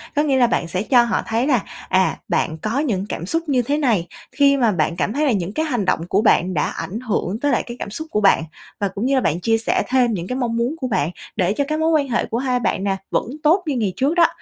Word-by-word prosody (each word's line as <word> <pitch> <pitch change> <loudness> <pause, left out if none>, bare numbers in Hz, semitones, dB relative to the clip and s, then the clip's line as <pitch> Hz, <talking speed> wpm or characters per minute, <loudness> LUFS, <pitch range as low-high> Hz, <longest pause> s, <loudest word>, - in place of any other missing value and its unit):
Có 295 - +3
nghĩa 275 -3 +2
là 245 - +5
bạn 175 - -1
sẽ 185 +4 -2
cho 245 +1 +5
họ 235 - 0
thấy 230 +4 0
là, 255 -8 +2 0.3
à, 185 -3 +2
bạn 160 - 0
có 215 - -2
những 215 -10 -1
cảm 170 - -4
xúc 330 - -1
như 260 -3 +3
thế 280 +5 -1
này, 230 - +1 0.2
khi 280 -1 +4
mà 235 -5 +3
bạn 170 -2 0
cảm 195 +4 -1
thấy 300 +3 +1
là 275 - +3
những 190 -2 -2
cái 315 - -1
hành 245 -10 -1
động 180 - +1
của 195 +3 +2
bạn 185 -4 +3
đã 150 - +1
ảnh 210 +5 -5
hưởng 220 -4 -2
tới 290 +2 +1
lại - - +1
cái 240 0 -8
cảm - - -5
xúc 315 +10 -6
của 210 - 0
bạn 195 -5 +4 0.4
và 200 - +1
cũng 195 +4 -4
như 275 +1 +2
là 260 - +3
bạn 160 -5 0
chia 225 +4 +2
sẻ 225 - 0
thêm 250 -2 +3
những 175 -3 -4
cái 250 - -3
mong 235 -3 -1
muốn 240 +6 0
của 260 -5 -3
bạn 170 -8 0 0.2
để 185 +1 +1
cho 285 - 0
cái 310 +1 -1
mối 320 +1 +1
quan 290 -4 +2
hệ 235 - 0
của 230 - -3
hai 255 -1 0
bạn 195 -4 -1
nè 195 -1 0 0.2
vẫn - - +1 0.2
tốt 345 +5 +4
như 295 -3 -1
ngày 210 -6 -1
trước 280 - +1
đó. 340 -1 +6
235 Hz, 290 wpm, -20 LUFS, 195-275 Hz, 0.4 s, đó